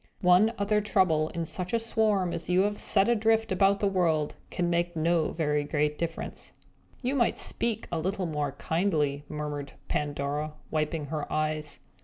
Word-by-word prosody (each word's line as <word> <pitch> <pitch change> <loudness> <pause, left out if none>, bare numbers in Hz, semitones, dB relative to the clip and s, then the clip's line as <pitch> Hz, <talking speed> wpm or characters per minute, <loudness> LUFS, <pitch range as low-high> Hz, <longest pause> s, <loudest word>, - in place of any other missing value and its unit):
One 185 +5 +5
other 210 +1 +1
Trouble, 180 -7 +2
in 170 -1 -3
such 180 +4 -2
a 230 - +3
swarm 215 -5 +1
as 170 - -5
you 180 +1 +4
have 205 +1 0
set 195 -1 +4
adrift 225 -1 +2
about 195 +1 +3
the 205 - +2
world, 165 -6 +1 0.2
can 175 - -1
make 175 0 0
no 165 0 +1
very 150 -2 0
great 150 0 -1
difference." 165 -1 -4 0.5
"You 255 +2 0
might 245 -4 +2
speak 230 -2 -1
a 170 - -1
little 190 +3 -1
more 150 -4 -2
kindly!" 150 -3 0
murmured 150 -2 -5 0.2
Pandora, 145 +1 -2 0.2
wiping 155 0 -1
her 150 -2 -3
eyes. 155 -1 -1
170 Hz, 165 wpm, -28 LUFS, 150-200 Hz, 0.5 s, One